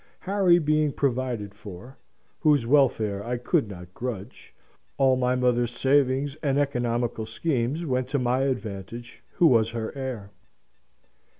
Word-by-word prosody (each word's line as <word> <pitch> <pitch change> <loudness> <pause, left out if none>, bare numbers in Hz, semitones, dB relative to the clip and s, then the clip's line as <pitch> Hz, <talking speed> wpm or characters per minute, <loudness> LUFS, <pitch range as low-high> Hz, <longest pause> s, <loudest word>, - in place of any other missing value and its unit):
Harry 190 -3 +3
being 155 -2 +2
provided 125 -7 -2
for 100 +5 -11 0.4
(whose 150 -6 +3
welfare 115 -7 +2
I 120 +2 -2
could 130 +2 +1
not 90 -2 -10
grudge), 115 -5 -7 0.5
all 135 -1 +4
my 125 0 +1
mother's 120 -1 +2
savings 135 0 +2
and 140 -2 +1
economical 120 -5 -1
schemes 140 +4 -1
went 130 -3 -1
to 140 - -1
my 125 0 +1
advantage, 115 -2 -5
who 175 - +3
was 115 -7 +5
her 115 +1 -5
heir. 125 -7 -5
125 Hz, 130 wpm, -26 LUFS, 115-140 Hz, 0.5 s, was